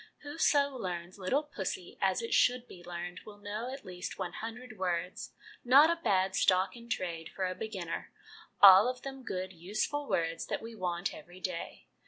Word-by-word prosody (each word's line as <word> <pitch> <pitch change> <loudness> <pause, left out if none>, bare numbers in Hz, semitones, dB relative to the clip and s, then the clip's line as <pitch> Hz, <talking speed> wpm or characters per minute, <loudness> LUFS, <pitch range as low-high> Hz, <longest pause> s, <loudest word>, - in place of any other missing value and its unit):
Whoso 290 -2 +2
learns 180 -4 -5
'Little 260 +11 +1
Pussy' 190 -10 -5
as 190 +2 +2
it 230 - -3
should 250 0 +3
be 175 - -12
learned 175 +1 -6
will 210 -1 -12
know 210 +4 -5
at 270 -3 -8
least 180 0 -6
one 185 -2 -4
hundred 225 0 -7
words 180 -1 -2 0.3
not 280 +6 +7
a 335 0 -2
bad 190 - +2
stock 185 +2 +3
in 235 0 -12
trade 170 -6 -3
for 190 - -3
a 185 - -1
beginner 190 -5 -5 0.5
all 195 +2 +11
of 255 0 -5
them 270 -1 -6
good 185 -5 -4
useful 215 - -2
words 165 -1 -1
that - - -2
we 230 +1 -7
want 180 -2 -2
every 175 +4 -12
day. 180 -2 -5
195 Hz, 180 wpm, -32 LUFS, 180-245 Hz, 0.5 s, all